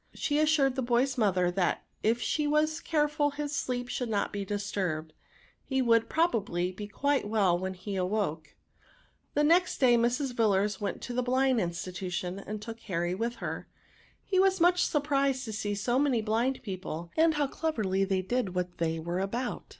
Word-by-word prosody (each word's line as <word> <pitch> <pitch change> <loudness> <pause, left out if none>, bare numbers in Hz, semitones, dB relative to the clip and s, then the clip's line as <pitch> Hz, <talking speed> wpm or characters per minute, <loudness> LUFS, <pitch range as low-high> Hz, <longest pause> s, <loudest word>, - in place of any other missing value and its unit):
She 290 0 0
assured 305 -4 +3
the 265 - -1
boy's 250 +2 +1
mother 185 -6 +2
that 180 -1 0 0.2
if 230 +2 +2
she 300 +4 0
was 305 +2 +2
careful 295 -1 +1
his 290 0 -4
sleep 245 -3 -2
should 245 -1 -3
not 205 -2 -1
be 200 -1 -2
disturbed, 190 -6 -3 0.5
he 265 -1 -1
would, 230 -3 +3
probably, 205 - +1
be 205 +3 -7
quite 280 +3 0
well 200 -5 +3
when 185 +1 -3
he 195 +2 -5
awoke. 180 -5 -2 0.8
The 295 - +3
next 345 +4 +3
day 245 -3 +5
Mrs. 245 +3 +1
Villars 210 -3 +1
went 205 - -3
to 245 - -5
the 250 - +1
NOUNS 250 - -6
133 260 0 +3
Blind 175 - 0
Institution, 180 +1 -4
and 210 +2 -6
took 230 +1 -7
Harry 175 -5 -2
with 230 +5 -2
her. - - -5 0.6
He 375 - +1
was 385 0 +4
mucli 355 +1 +4
surprised 280 -5 +1
to 220 - -5
see 205 -1 -2
so 240 +5 +1
many 265 -6 +2
blind 235 +5 0
people, 180 -4 -5
and 320 0 +4
how 295 -1 +2
cleverly 215 -11 -1
they 190 -1 0
did 200 -2 -1
what 180 -1 -3
they 165 -1 0
were 170 +3 -3
about. 235 +6 -3
230 Hz, 185 wpm, -29 LUFS, 190-275 Hz, 0.8 s, day